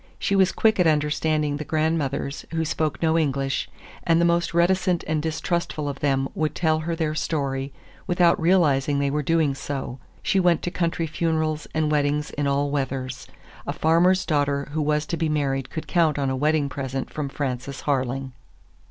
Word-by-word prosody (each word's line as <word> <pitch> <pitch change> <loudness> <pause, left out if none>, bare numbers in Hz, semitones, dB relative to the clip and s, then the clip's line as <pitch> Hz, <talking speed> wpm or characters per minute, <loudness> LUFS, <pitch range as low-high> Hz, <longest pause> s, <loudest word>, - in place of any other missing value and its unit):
She 200 - 0
was 190 -1 +4
quick 220 -2 +2
at 180 - +5
understanding 150 -1 +1
the 150 - -4
grandmothers 150 -3 -1
who 165 0 0
spoke 155 0 -2
no 160 0 +3
English, 135 -3 -1 0.3
and 165 -1 +2
the 170 - +4
most 170 0 +2
reticent 180 +1 +2
and 155 -1 0
distrustful 160 -1 -2
of 140 -1 -4
them 135 -2 +1
would 155 -1 -1
tell 160 -2 +2
her 165 +1 -2
their 160 -2 -1
story 140 -3 -2 0.4
without 175 -2 +3
realizing 150 -6 +3
they 140 0 +1
were 150 +1 0
doing 160 -1 +2
so. 135 -2 -5 0.2
She 195 - +2
went 175 -3 +3
to 175 - -2
country 170 -2 -1
funerals 155 -1 -1
and 155 -1 +1
weddings 150 0 0
in 145 0 -2
all 140 +1 +1
weathers. 135 -2 -3 0.4
A - - -1
farmer's 175 +4 +3
daughter 145 -2 0
who 155 +1 -1
was 150 0 +1
to 170 - -3
be 160 -1 0
married 135 -3 -1
could 160 - -5
count 165 -5 +2
on 135 -2 0
a - - -1
wedding 150 +1 +1
present 135 -1 -4
from 150 -2 -3
Frances 135 -1 -4
Harling. 135 -1 -1
150 Hz, 180 wpm, -24 LUFS, 140-165 Hz, 0.4 s, at